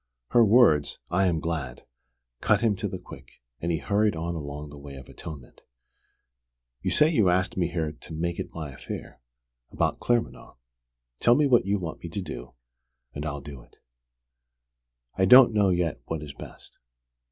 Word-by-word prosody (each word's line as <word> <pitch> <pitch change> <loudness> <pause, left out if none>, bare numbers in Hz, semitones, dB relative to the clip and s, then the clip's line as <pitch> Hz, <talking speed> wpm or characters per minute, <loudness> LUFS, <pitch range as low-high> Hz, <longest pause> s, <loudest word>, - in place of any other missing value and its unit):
Her 120 - +5
words, 105 - +4
"I 95 +2 +3
am 85 -3 +1
glad," 75 -7 -4 0.5
cut - - +2
him 110 -3 +2
to 105 - -2
the 95 - -5
quick, 90 - -13 0.3
and 85 - -2
he 80 - +1
hurried 100 +7 +1
on 85 +1 -3
along 75 -2 -6
the 75 - -11
way 70 -1 -10
of 65 -1 -11
atonement. 70 -6 -10 1.2
"You - - -1
say 150 - +4
you 115 - +3
asked 95 +1 +1
me 90 -3 +1
here 80 -3 -2
to 75 - -13
'make 85 +2 -2
it - - -5
my 80 -4 -6
affair' 65 - -8 0.5
about - - -1
Claremanagh. 120 -1 -1 0.6
Tell 120 - +5
me 150 +2 +3
what 120 -7 +4
you 100 +1 +2
want 85 -4 -6
me 85 - -7
to 100 +5 -4
do, 60 -6 -8 0.6
and 75 +3 -4
I'll 70 -1 -4
do 70 -2 -10
it." - - -23 1.4
"I 95 - +5
don't 125 +2 +8
know 105 -2 +3
yet 85 -8 0
what 80 -2 -4
is 75 -2 -8
best. - - -12
85 Hz, 175 wpm, -26 LUFS, 75-100 Hz, 1.4 s, don't